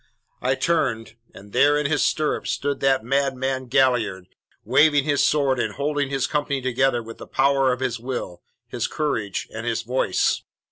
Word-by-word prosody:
"I 130 +1 +1
turned, 130 -7 0 0.2
and 100 +1 -14
there 145 +1 +4
in 150 - -1
his 150 +1 +1
stirrups 155 -1 0
stood 140 -1 -2
that 135 -3 +2
madman 130 0 -1
Galliard, 120 -8 +1 0.4
waving 145 +4 +4
his 145 -1 +1
sword 140 -4 +2
and - - -2
holding 145 -1 -1
his 135 -2 0
company 145 -2 -1
together 130 -1 +1
with 115 +1 -10
the - - -9
power 135 -1 +2
of 125 +1 -3
his 125 -3 -2
will, 120 -8 -5 0.3
his - - -3
courage, 115 -10 -2
and 110 +1 -5
his 115 -1 -2
voice. 125 +3 0
135 Hz, 170 wpm, -23 LUFS, 120-140 Hz, 0.4 s, there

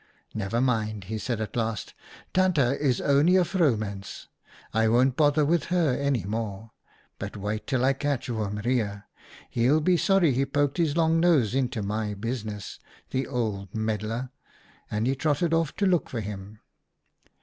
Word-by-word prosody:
" - - -35
' - - -34
Never 110 +2 -1
mind,' 110 -5 0
he 110 +4 -4
said 120 0 -2
at 110 - -5
last, 115 -2 -2 0.2
' - - -21
Tante 185 -3 +3 0.2
is 130 -4 +2
only 145 +6 +4
a 185 - +5
vrouwmens; 110 - -1 0.4
I 110 +1 +3
won't 125 +3 +3
bother 150 0 +3
with 170 +2 +1
her 170 -7 +2
any 140 -7 0
more. 110 +1 -4 0.5
But - - -6
wait 105 +2 -4
till 130 -2 +1
I 135 - +4
catch 140 -1 -2
Oom 105 -4 -2
Reijer. 105 -3 -1 0.5
He'll 125 +6 +3
be 175 +3 +3
sorry 185 -6 +3
he 130 +3 +1
poked 145 +1 0
his 165 -3 +1
long 165 0 +3
nose 155 - +3
into 125 -5 -1
my 105 +1 -2
business, 105 -1 -5 0.3
the 130 +1 -1
old 105 -7 -3
meddler,' 110 +3 -2 0.6
and 105 +2 -1
he 130 - +2
trotted 155 +4 0
off 165 -3 +1
to 200 - 0
look 180 -3 +2
for 115 - -3
him. 105 +1 -8
125 Hz, 170 wpm, -26 LUFS, 110-145 Hz, 0.6 s, a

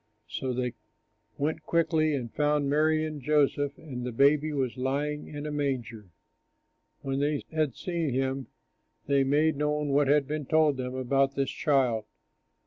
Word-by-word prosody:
So 130 - -3
they 125 -1 -2 0.6
went 155 +2 -1
quickly 155 -1 +1
and 120 -4 -5
found 150 -1 +1
Mary 155 +2 +2
and 155 -2 -5
Joseph; 145 0 +1
and 140 -7 -7
the 125 - -3
baby 145 +5 +3
was 135 -5 -1
lying 140 +3 -2
in 145 0 -7
a 150 - -3
manger. 120 -8 -3 0.9
When 135 0 -2
they 145 0 0
had 155 -5 0
seen 170 -4 -2
him, 130 +1 -1 0.6
they 140 -1 +3
made 150 +3 +2
known 150 0 0
what 140 0 +3
had 145 0 +4
been 150 -2 -3
told 155 -3 +3
them 125 0 -4
about 135 +1 +1
this 135 -1 0
child. 125 -7 +1
145 Hz, 155 wpm, -28 LUFS, 130-150 Hz, 0.9 s, had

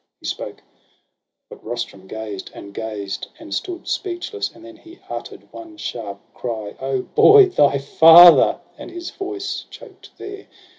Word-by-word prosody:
He - - -15
spoke; - - -6 0.8
but - - -14
Rustum 110 -5 -6
gazed, 105 -2 -7
and 100 0 -11
gazed, 100 -3 -6
and 320 0 -10
stood 360 -1 -5
Speechless; 375 +3 -4
and 330 - -17
then 330 0 -13
he 335 +2 -16
utter'd - - -9
one 330 -1 -11
sharp 105 - -6
cry: 110 -4 -6
O 135 -1 -2
boy 420 -1 +6
— - - -5
thy 145 - +3
father! 165 +5 +7
— - - -34
and - - -9
his 345 0 -8
voice 395 0 -6
choked 430 -6 -15
there. 400 0 -10
175 Hz, 155 wpm, -20 LUFS, -, 0.8 s, father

